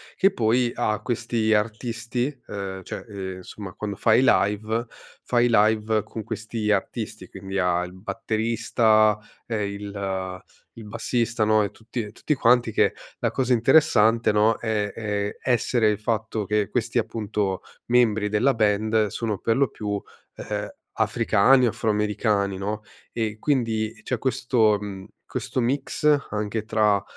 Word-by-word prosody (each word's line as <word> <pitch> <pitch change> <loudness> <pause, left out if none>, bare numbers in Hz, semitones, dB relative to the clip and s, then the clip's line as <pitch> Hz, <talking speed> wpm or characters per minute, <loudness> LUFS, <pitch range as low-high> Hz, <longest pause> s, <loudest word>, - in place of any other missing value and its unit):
Che 195 +1 +4
poi 120 - +2
ha 110 -3 0
questi 115 -2 -1
artisti 115 +3 -2 0.2
ehm, 95 -2 -5
cioè, - - -7
ehm, 95 -2 -6
insomma 95 +1 -9
quando 105 -1 -5
fa 110 +2 +3
i 120 - +5
live, 110 -1 +2 0.4
fa 120 - +1
i 120 - +4
live 110 0 +3
con 110 - -7
questi 110 0 -3
artisti, 105 -1 -2
quindi 95 +1 -6
ha 90 -1 +2
il 90 - -11
batterista, 110 +1 +1 0.3
ehm, 105 -3 -1
il 100 -2 -5 0.4
il 110 - -9
bassista, 115 0 -1
no, 110 0 +4
e 100 - -3
tutti 115 +2 -6
e 105 - -9
tutti 150 - -1
quanti 120 -2 +3
che - - +2 0.3
la - - 0
cosa 130 -1 -1
interessante, 115 -3 +4
no, 105 +1 +3
è 105 -3 -2
ehm, 105 -2 -2
essere 120 -2 +2
il 105 -1 -1
fatto 110 -1 -2
che 105 +1 0
questi, 120 0 -1
appunto, 105 -3 -2 0.3
membri 110 -4 +3
della 110 +7 +3
band 110 0 +2
sono 105 -1 -3
per 115 - +1
lo 140 0 +3
più, 105 -2 -6
uhm, 105 0 -6 0.2
africani 130 +5 +3
o - - +3
afroamericani, 105 -2 0
no, 105 +2 -3 0.3
e 110 -2 -2
quindi 115 -5 0
c'è 125 - -1
questo, 115 -4 +2
mhmm, 100 -2 -7 0.2
questo - - -3
mix, 145 +4 +2
anche 105 0 -2
tra 105 -3 +2
110 Hz, 150 wpm, -24 LUFS, 105-115 Hz, 0.4 s, i